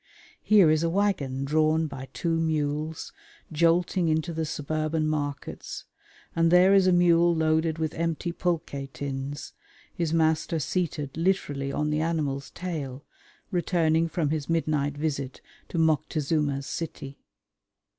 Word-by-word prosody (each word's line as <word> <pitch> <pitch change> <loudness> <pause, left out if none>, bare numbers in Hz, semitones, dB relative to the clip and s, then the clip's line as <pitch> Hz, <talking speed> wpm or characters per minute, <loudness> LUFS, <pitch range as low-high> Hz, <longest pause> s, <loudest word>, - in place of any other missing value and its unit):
Here 200 -7 +5
is 155 0 +2
a 165 - +1
waggon 165 -9 0
drawn 155 +2 +2
by 135 -3 -7
two 165 -1 -1
mules 155 -1 -2 0.4
jolting 170 +2 +2
into 160 +2 0
the 160 0 -2
suburban 155 +2 -1
markets, 145 -2 -4 0.5
and 165 0 +3
there 180 +2 +6
is 195 -1 +5
a - - +5
mule 175 -1 +4
loaded 160 0 +1
with 160 -1 -2
empty 165 +1 -2
pulque 170 -1 -2 0.2
tins, 140 +2 -5 0.4
his 170 -3 -2
master 160 0 +1
seated 150 -3 -2
literally 155 -6 0
on 150 +1 -1
the 150 +1 0
animal's 150 -4 -1
tail, 145 -7 -5 0.5
returning 165 -3 +2
from 155 -2 -1
his 155 -1 -2
midnight 150 -3 0
visit 140 -4 -3 0.3
to - - -5
Moctezuma's 155 -2 +1
city. 140 -4 -6
160 Hz, 130 wpm, -27 LUFS, 145-165 Hz, 0.5 s, there